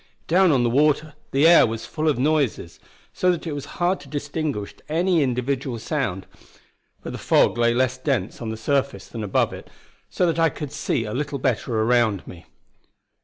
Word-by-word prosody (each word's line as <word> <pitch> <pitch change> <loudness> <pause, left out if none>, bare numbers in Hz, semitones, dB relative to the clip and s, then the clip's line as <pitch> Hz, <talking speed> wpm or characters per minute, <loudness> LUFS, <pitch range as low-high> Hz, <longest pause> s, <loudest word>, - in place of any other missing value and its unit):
Down 180 +1 +4
on 130 -4 +3
the 120 - +2
water 150 +3 +2 0.2
the 140 +3 +2
air 170 -6 +7
was 115 0 -5
full 155 0 -3
of 145 - +1
noises, 140 - 0 0.3
so 185 - +1
that 175 - -4
it 165 - -3
was 145 -2 -5
hard 180 +2 +1
to - - -14
distinguish 145 -6 -3 0.2
any 170 +1 +2
individual 130 -1 -1
sound; 115 - -3 0.8
but - - -6
the - - -6
fog - - +3
lay 120 0 +3
less 130 0 +1
dense 130 -8 -2
on 115 - -4
the 110 - -4
surface 135 -3 -1
than 115 -2 -6
above 100 - +1
it, - - -10 0.4
so 180 - 0
that 165 -1 0
I 165 0 +4
could 150 -1 -7
see 145 -5 -1
a 105 - -5
little 140 +1 -2
better 125 -3 -1
around 110 -3 +2
me. 85 -1 -12
135 Hz, 190 wpm, -23 LUFS, 115-155 Hz, 0.8 s, air